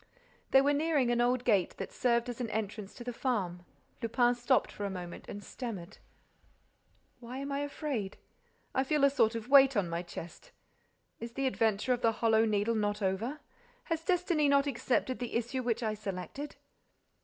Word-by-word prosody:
They 270 - +7
were 285 +1 +3
nearing 290 -4 +2
an 240 0 +2
old 245 +1 +2
gate 205 -7 +2
that - - -5
served 235 -1 +1
as 245 0 -5
an 235 - -2
entrance 210 -2 -4
to 240 - -8
the 245 0 -4
farm. 195 -9 -2 0.4
Lupin 240 +1 +3
stopped 245 +2 +1
for 205 - -7
a 200 - -1
moment 180 -2 -7
and 205 - -7
stammered: 210 -10 -7 1.2
"Why 245 +1 -7
am 275 +1 -4
I 280 - -1
afraid?—I 270 -3 -4
feel 295 +1 +1
a 280 - +6
sort 230 -5 +3
of 230 0 -5
weight 270 -2 +7
on 195 -3 +2
my 170 +1 -1
chest. 175 - -9 0.7
Is 230 +1 -7
the 270 +2 -1
adventure 225 -1 +1
of 245 - -3
the 230 -2 +3
Hollow 225 0 +3
Needle 215 +1 +1
not 210 -1 -1
over? 225 +10 -1 0.4
Has 330 -1 -2
destiny 350 -5 +2
not 280 0 +4
accepted 255 -1 0
the 245 -2 -4
issue 240 +3 -1
which 235 -1 -1
I 215 -1 0
selected?" 215 +8 -6
240 Hz, 180 wpm, -31 LUFS, 210-270 Hz, 1.2 s, They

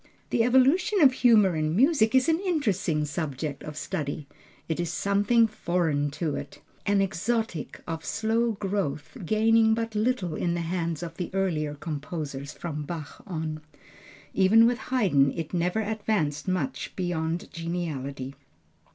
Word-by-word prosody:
The 230 - +3
evolution 275 - +4
of 270 -3 +7
humor 215 -8 +5
in 155 +1 0
music 260 - +4
is 260 +2 +4
an 325 0 +3
interesting 205 - 0
subject 150 -2 -4
of 150 0 -8
study. 145 -1 -4 0.4
It 160 0 -2
is 175 -1 -1
something 205 +4 +3
foreign 170 -8 0
to 155 -4 -1
it, - - -7 0.3
an 200 -1 +3
exotic, 195 -1 -2
of 165 -1 -4
slow 225 +3 0
growth, 195 -8 -3
gaining 220 +3 +4
but 225 -1 -3
little 210 -6 0
in 170 +2 -1
the 170 - -1
hands 170 -1 -2
of 165 0 -7
the 180 - -3
earlier 155 -6 0
composers 145 -2 -5
from 155 -3 -5
Bach 150 -1 -7
on. 160 -4 -4 0.7
Even 215 +4 +6
with 240 +1 +2
Haydn 175 - +3
it 165 -1 -5
never 180 +5 +1
advanced 210 -9 -1
much 185 +8 -2
beyond 170 -2 -2
geniality. 145 -6 -4
180 Hz, 145 wpm, -27 LUFS, 155-220 Hz, 0.7 s, of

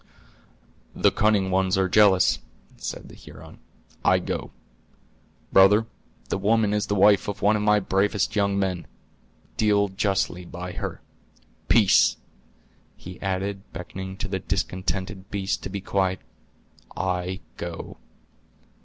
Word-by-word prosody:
"The - - +3
cunning 105 -3 +2
ones 95 +1 +2
are 95 -1 +2
jealous," 95 -1 +4 0.4
said - - -6
the - - -14
Huron; - - -13 0.4
"I - - +4
go. - - -4 1.0
Brother, 105 +3 +6 0.4
the - - -1
woman 105 +1 +2
is 105 0 0
the 105 - 0
wife 100 +1 +5
of 100 -2 -5
one 105 +2 +4
of 105 - -1
my 105 0 +4
bravest 100 +1 0
young 100 -1 +1
men; 95 -3 -2 0.7
deal 105 -2 +3
justly 95 -2 -1
by 90 +1 -7
her. - - -6 0.7
Peace!" 95 - +5 0.8
he 90 0 -11
added, 95 +1 -2
beckoning 95 +1 -7
to - - -4
the 95 -1 -3
discontented 95 +1 -3
beast 95 -3 -2
to - - -6
be 100 - -5
quiet; 95 -1 0 0.8
"I 90 +1 -2 0.2
go." 85 -1 -7
95 Hz, 125 wpm, -25 LUFS, 95-100 Hz, 1.0 s, Brother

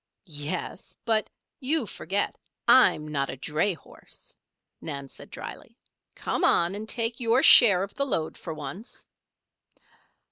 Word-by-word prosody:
"Yes. 155 +3 -5
But 220 -2 +1 0.3
you 285 0 0
forget 195 0 -2 0.3
I'm 155 -11 +5
not 140 -2 -2
a - - -5
dray 155 +8 0
horse," - - -11 0.5
Nan 140 -3 -6
said - - -13
drily. - - -9 0.4
"Come - - -3
on 170 +2 +3
and 215 +2 -5
take 230 +1 -1
your 240 +2 +2
share 195 -6 +8
of 200 - -7
the 280 - -1
load 160 - -2
for 165 - -7
once." 155 - -8
190 Hz, 135 wpm, -26 LUFS, 155-230 Hz, 0.5 s, share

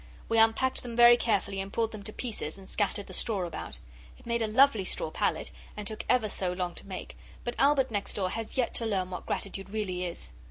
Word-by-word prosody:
We 225 0 +4
unpacked 225 +4 +3
them 240 -2 -6
very 240 0 +9
carefully 200 -4 0
and 195 +1 -6
pulled 225 0 0
them 215 - -7
to 215 - -5
pieces 215 -10 -5
and 195 -1 -12
scattered 205 -1 0
the - - -10
straw 200 -6 0
about. 170 - -6 0.4
It - - -19
made 235 0 0
a 220 - +1
lovely 230 -1 +5
straw - - -1
pallet, - - 0 0.3
and 210 - -5
took 215 +2 -5
ever 250 -3 +4
so 185 -3 -1
long 180 -1 -2
to - - -10
make 190 -2 -7 0.3
but 240 - -2
Albert 275 -3 +4
next 205 -2 -1
door 185 -3 0
has 225 +2 -4
yet 250 -3 +1
to 230 - -1
learn 190 -3 0
what 180 - -6
gratitude 195 0 -3
really 195 -4 -2
is. 170 - -3
215 Hz, 230 wpm, -29 LUFS, 195-235 Hz, 0.4 s, very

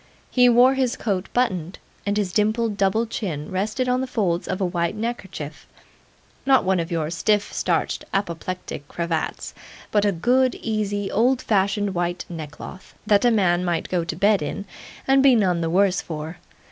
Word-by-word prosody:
He 250 -1 +5
wore 245 +2 +6
his 260 -3 0
coat 195 -3 -2
buttoned; 185 -8 -1 0.3
and 205 +1 +1
his 195 -4 -1
dimpled 215 +1 +1
double 200 +3 +1
chin 175 -10 -4
rested 215 +7 -1
in 250 +1 +1
the 260 - -2
folds 185 -8 -1
of 185 - -2
a 190 - +1
white 175 0 -1
neckerchief 190 -9 -5 0.8
not 270 -1 +4
one 185 -1 +2
of 165 +1 -3
your 160 -2 -1
stiff 205 +5 +1
starched - - -1
apoplectic 180 -5 -4
cravats, 170 -1 -3 0.4
but 205 -1 +3
a 205 - +3
good, 250 +8 +2
easy, 205 -2 -2
old 250 +4 +3
fashioned 200 -2 +1
white 175 0 -2
neckcloth 160 +2 -9
that 210 +1 +3
a - - +6
man 185 -6 +2
might 175 -2 -1
go 180 -2 0
to 165 - -4
bed 200 +2 +3
in 150 +7 -4 0.4
and 270 0 +5
be 270 -2 +6
none 185 -6 +2
the 165 - -1
worse 190 +2 +2
for. 160 +1 -6
195 Hz, 170 wpm, -23 LUFS, 175-225 Hz, 0.8 s, wore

